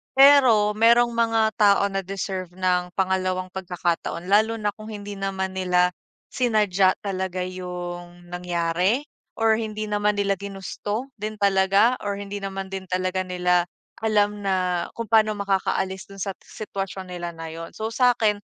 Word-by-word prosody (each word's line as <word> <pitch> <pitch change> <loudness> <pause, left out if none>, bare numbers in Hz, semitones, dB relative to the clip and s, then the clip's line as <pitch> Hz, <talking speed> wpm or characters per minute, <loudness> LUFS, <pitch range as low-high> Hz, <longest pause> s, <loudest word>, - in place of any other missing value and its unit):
Pero 260 -7 +7
merong 235 +2 +4
mga 225 -1 +2
tao 200 -1 +5
na 195 - -1
deserve 190 -1 -5
ng 180 -1 0
pangalawang 185 -1 0
pagkakataon, 180 -1 -3
lalo 220 +2 +4
na 210 -2 -1
kung 215 +1 -12
hindi 205 -2 -7
naman 190 -1 -2
nila 180 -1 +2 0.4
sinadya 210 -6 +2
talaga 185 -2 -2
'yung 175 -1 -7
nangyari? 180 - 0 0.3
Or 225 0 +3
hindi 215 -1 -4
naman 210 0 +1
nila 200 -2 0
ginusto 205 +5 -5
din 215 +1 -4
talaga, 200 +4 +3
or 205 -1 -3
hindi 200 0 -6
naman 195 -1 -5
din 190 -1 -5
talaga 185 +1 -1
nila 180 -1 +1 0.3
alam 210 -2 +1
na 185 -3 0
kung 230 -1 -6
paano 215 -1 +4
makakaalis 190 -1 -1
doon 195 -2 -6
sa 195 - -2
sitwasyon 195 -3 -6
nila 175 -1 -5
na 165 0 -7
'yun. 165 +1 -8
So 220 +1 -3
sa 245 0 +4
akin, 210 -3 +1
195 Hz, 150 wpm, -24 LUFS, 185-215 Hz, 0.4 s, Pero